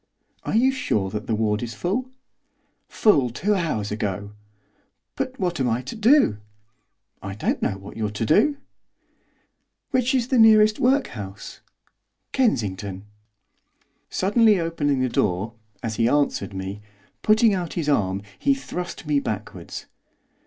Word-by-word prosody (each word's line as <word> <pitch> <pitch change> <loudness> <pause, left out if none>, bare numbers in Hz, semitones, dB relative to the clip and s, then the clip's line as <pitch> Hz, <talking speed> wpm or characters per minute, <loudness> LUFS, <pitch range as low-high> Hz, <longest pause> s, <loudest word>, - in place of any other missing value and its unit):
'Are - - -1
you 255 +4 +4
sure 105 - -1
that 110 +3 -5
the 110 - +1
ward 105 -1 0
is 115 -2 -5
full?' 215 - -2 0.8
'Full 145 - +3
two 195 - 0
hours 155 - -1
ago!' 100 -1 -3 0.8
'But 260 0 -4
what 175 -4 -1
am 130 -2 +1
I 115 +2 -1
to 130 - -7
do?' 225 - +4 0.8
'I 95 0 -6
don't 105 - -1
know 95 - -1
what 100 +1 -11
you're 110 -2 -1
to 105 +2 -3
do!' 285 - +3 1.3
'Which 255 -1 +2
is 250 -1 0
the 255 - +3
next - - +8
nearest 215 -1 +6
workhouse?' 120 - -1 0.7
'Kensington.' 100 - -1 1.0
Suddenly 210 +1 +3
opening 145 -5 0
the 130 - +2
door, 105 -1 0 0.3
as 110 -2 -3
he 115 +1 +3
answered 145 -8 0
me, 95 +2 -5 0.4
putting 215 0 +4
out 180 -4 -3
his 165 -4 -2
arm 100 -8 +1 0.2
he 275 0 +3
thrust 180 -11 -6
me 150 -1 +2
backwards. 110 -5 -6
140 Hz, 140 wpm, -23 LUFS, -, 1.3 s, next